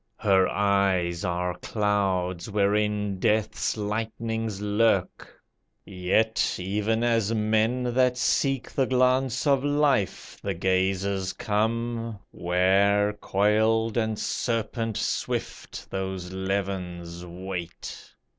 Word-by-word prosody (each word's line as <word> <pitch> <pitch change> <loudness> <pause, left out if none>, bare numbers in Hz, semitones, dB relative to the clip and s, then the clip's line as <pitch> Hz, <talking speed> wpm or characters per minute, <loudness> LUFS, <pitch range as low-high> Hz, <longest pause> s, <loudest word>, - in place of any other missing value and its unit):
Her 95 -3 +3
eyes 95 -4 +1
are 90 -1 -1
clouds 95 -4 -1
wherein 105 -1 +1
Death's 110 +2 0
lightnings 110 0 -3
lurk, 105 +2 +1 0.5
Yet, 95 +5 +1
even 105 +5 -1
as 115 -2 +2
men 110 +3 +1
that 125 0 +3
seek 135 +1 +1
the 135 -2 +1
glance 130 0 +2
of 140 -2 +3
Life, 145 - 0
The - - -2
gazers 95 +1 0
come, 115 +2 -1
where, 100 +4 +2
coiled 110 +2 +1
and 110 -2 0
serpent 115 -1 -2
swift, - - -3
Those 95 -1 -4
levins 95 -3 -3
wait. 90 -1 -7
105 Hz, 95 wpm, -26 LUFS, 95-115 Hz, 0.5 s, Her